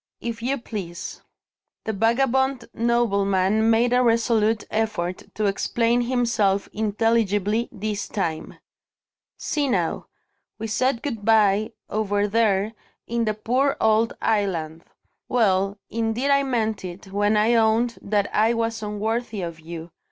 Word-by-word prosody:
"If 235 -1 -5
you 265 +4 0
please." 190 -8 -7 0.6
The 220 - -2
vagabond 255 +4 +1
nobleman 215 -3 +2
made 235 +2 +3
a 250 - +4
resolute 230 -2 +2
effort 210 -5 -1
to 215 - 0
explain 235 +4 +1
himself 235 -5 +1
intelligibly, 215 0 +1
this 210 0 -4
time: 165 -6 -3 0.8
"See 295 -2 -1
now! 250 - -1 0.5
We 220 - -5
said 235 +2 0
good 230 -8 -4
bye, 215 0 +3
over 205 -1 0
there, 210 -1 +1 0.3
in 235 0 -1
the 215 -1 0
poor 255 +6 +1
old 220 +1 +3
island. 170 -7 -1 0.4
Well, 200 -4 +2
indeed 230 +4 0
I 280 0 +5
meant 225 -6 -1
it, 185 +2 -8
when 205 +2 +2
I 220 +3 +3
owned 230 +1 +2
that 205 0 0
I 225 +2 +3
was 230 0 -2
unworthy 215 0 -2
of 170 -1 -6
you. 165 +1 -8
220 Hz, 130 wpm, -23 LUFS, 200-235 Hz, 0.8 s, I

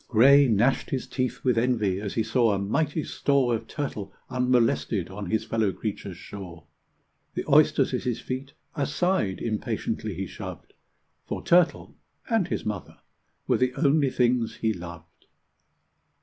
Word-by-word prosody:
Gray 135 +5 +6
gnashed 120 +4 +2
his 130 - -2
teeth 130 -2 -3
with 125 -3 +3
envy 110 -6 +1
as 100 -2 -4
he 110 - +2
saw 115 -2 +2
a - - 0
mighty 145 - 0
store 140 -4 +1
Of 115 - -3
turtle 135 -9 -4 0.2
unmolested 120 -7 +1
on 100 -1 -6
his 110 - 0
fellow 110 -3 +1
creature's 95 -1 -5
shore. 90 -3 -9 0.7
The - - -2
oysters - - +4
at - - 0
his 120 -2 -2
feet 130 +3 -5 0.2
aside 145 - 0
impatiently 110 -2 -3
he 95 +3 -3
shoved, - - -9 0.5
For - - -4
turtle 175 -1 +2 0.3
and 225 -7 +1
his - - -3
mother 105 -4 -5 0.5
were - - +2
the 125 -1 +1
only 145 -2 +3
things 125 -2 +1
he 110 -1 0
loved. 85 -3 -11
115 Hz, 150 wpm, -26 LUFS, 100-135 Hz, 0.7 s, Gray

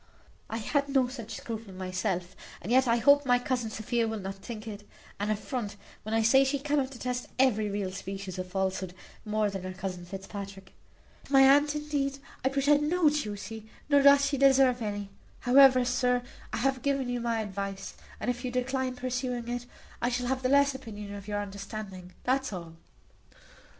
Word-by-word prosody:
I 225 - -3
had 280 +5 0
no 265 -2 +3
such 235 -4 -7
scruple 220 -4 -7
myself; 185 -1 -2 0.2
and 200 - -6
yet 260 +1 +5
I 230 - +4
hope 285 +5 +5
my 245 -2 +4
cousin 245 -2 -1
Sophia 225 +2 -1
will 220 0 -2
not 195 0 -4
think 215 +3 -8
it 205 -1 -8 0.3
an 205 +1 -1
affront 215 0 -3 0.3
when 220 +1 -3
I 225 - +3
say 265 +5 +6
she 270 +1 +1
cannot 280 -1 0
detest 250 -1 -4
every 220 -5 +3
real 200 -2 -2
species 195 -1 -6
of 185 0 -4
falsehood 190 -1 -2 0.3
more 210 -1 +1
than 195 -1 -4
her 185 0 -5
cousin 185 -2 -5
Fitzpatrick. 195 0 -8 0.5
To - - -16
my 270 - +8
aunt, 290 +2 +5
indeed, 290 -2 -1 0.3
I 265 - +3
pretend 290 +2 +3
no 350 -2 +4
duty, 220 -5 -4 0.2
nor 285 -1 +6
doth 280 0 +7
she 280 -1 -1
deserve 265 -2 +5
any. 205 -2 -3 0.3
However, 255 0 +7
sir, 250 0 +1 0.3
I - - -2
have 270 -1 0
given 275 -1 0
you 245 -1 -2
my 230 -1 0
advice; 200 -2 -4 0.3
and 245 - 0
if 245 +1 -7
you 255 - -1
decline 255 +1 -1
pursuing 250 -1 -3
it, 245 0 -4 0.3
I 240 - +2
shall 250 0 -1
have 260 +1 -1
the 255 - +1
less 280 0 +5
opinion 210 -6 -8
of 200 0 -8
your 205 -1 -1
understanding 195 -2 -8
that's 265 0 +1
all." 170 -4 -7
240 Hz, 185 wpm, -29 LUFS, 200-265 Hz, 0.5 s, my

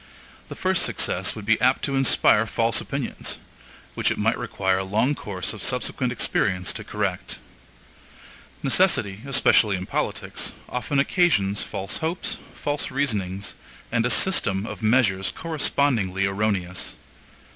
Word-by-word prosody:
The - - -7
first - - +1
success - - +1
would 110 - -8
be 115 +1 +2
apt 130 +1 +3
to 140 - -1
inspire 115 -4 +4
false 115 0 +1
opinions, 140 -3 -3 0.6
which - - +1
it - - -2
might - - +2
require 95 -1 -1
a - - -2
long 110 +9 +1
course 100 -8 -3
of 110 - -9
subsequent 125 0 -1
experience 95 -6 0
to 110 - -5
correct. 105 -4 -3 1.3
Necessity, 130 - +2
especially 120 -6 +4
in 90 - -5
politics, - - -3
often 125 +3 -2
occasions 140 - +2
false 95 +1 -3
hopes, 165 +3 -2 0.2
false 145 0 -2
reasonings, 100 -8 -2 0.4
and 115 -1 +2
a 125 - +1
system 105 - +2
of - - -7
measures 110 -5 +2
correspondingly 135 - +1
erroneous. 95 -3 -2
110 Hz, 135 wpm, -24 LUFS, 95-135 Hz, 1.3 s, inspire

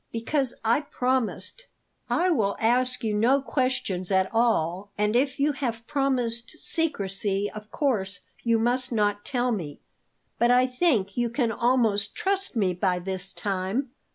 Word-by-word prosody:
Because 250 +3 -1
I 235 +6 +3
promised 260 - -2 0.2
" - - -44
"I 365 - +3
will 205 -10 +1
ask 250 +3 +2
you 220 -2 0
no 235 +7 +3
questions 255 -9 -1
at 190 0 +1
all, 200 -5 +1
and 210 +1 +1
if 270 +2 +1
you 290 +2 +3
have 235 -5 -4
promised 255 -2 -1
secrecy 205 - -1
of 215 0 -9
course 200 -10 -1 0.2
you 230 -1 +2
must 250 +3 +1
not 205 -2 +1
tell 250 -2 0
me; 165 -10 -4 0.6
but 235 - +4
I 250 +1 +5
think 250 - +1
you 240 -1 +1
can 235 -1 0
almost 225 -4 +1
trust 390 -4 0
me 195 -5 +2
by 180 0 0
this 190 +1 -3
time." 200 +7 -2
235 Hz, 155 wpm, -26 LUFS, 200-260 Hz, 0.6 s, I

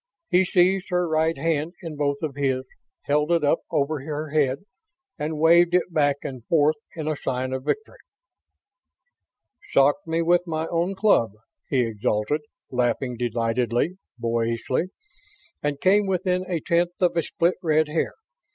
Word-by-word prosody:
He 185 +1 +5
seized 185 +2 +2
her 180 -1 +1
right 160 +1 +1
hand 160 0 -1
in 165 -3 -6
both 145 0 -1
of 150 -3 -2
his, 135 -2 0 0.4
held 150 +3 +1
it 170 -2 +3
up 145 +3 +3
over 150 0 0
her 150 +2 -5
head, 140 +1 0 0.5
and 155 +1 -2
waved 170 +2 +5
it 180 -1 +1
back 145 -2 +3
and 130 -4 -6
forth 155 -1 +3 0.2
in 160 -2 -4
the 155 - 0
sign 130 -1 -3
of 130 0 -4
victory. 435 +1 -3 1.7
"Socked 145 +8 +3
me 165 +1 0
with 175 +1 +4
my 160 -1 -2
own 175 +3 0
club!" 190 - +3 0.4
he 135 -3 +2
exulted, 110 +4 -1 0.3
laughing 125 0 0
delightedly, 120 - 0 0.2
boyishly. 115 +4 -1 0.8
"And 145 -1 -2
came 200 +4 +3
within 185 -1 0
a 170 -3 -1
tenth 175 +2 0
of 180 -2 +2
a 165 - +3
split 170 +3 0
red 155 -3 +2
hair! 155 +2 -1
155 Hz, 150 wpm, -24 LUFS, 130-170 Hz, 1.7 s, He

